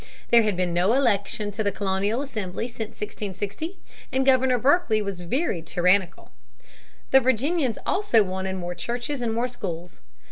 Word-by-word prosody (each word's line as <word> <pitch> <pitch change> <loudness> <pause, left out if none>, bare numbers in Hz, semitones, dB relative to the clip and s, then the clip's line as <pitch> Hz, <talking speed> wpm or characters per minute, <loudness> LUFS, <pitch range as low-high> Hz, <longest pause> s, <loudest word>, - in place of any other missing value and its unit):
There 235 -1 +8
had 210 -4 0
been 180 -1 0
no 180 +6 +3
election 210 -5 +1
to 210 +2 -3
the 200 - +1
colonial 200 +5 -1
assembly 220 -5 -4
since 225 -3 -7
1660 210 - -5 0.3
and 265 0 +1
Governor 260 -1 +4
Berkeley 265 -3 +3
was 200 -3 -4
very 190 - -1
tyrannical. 180 +3 +1 0.8
The 265 - +8
Virginians 260 +1 +1
also 375 - +3
wanted 190 0 -3
more 175 -1 -4
churches 245 +8 -4
and 235 -2 0
more 235 +2 0
schools. 180 -8 -7
215 Hz, 150 wpm, -25 LUFS, 190-255 Hz, 0.8 s, There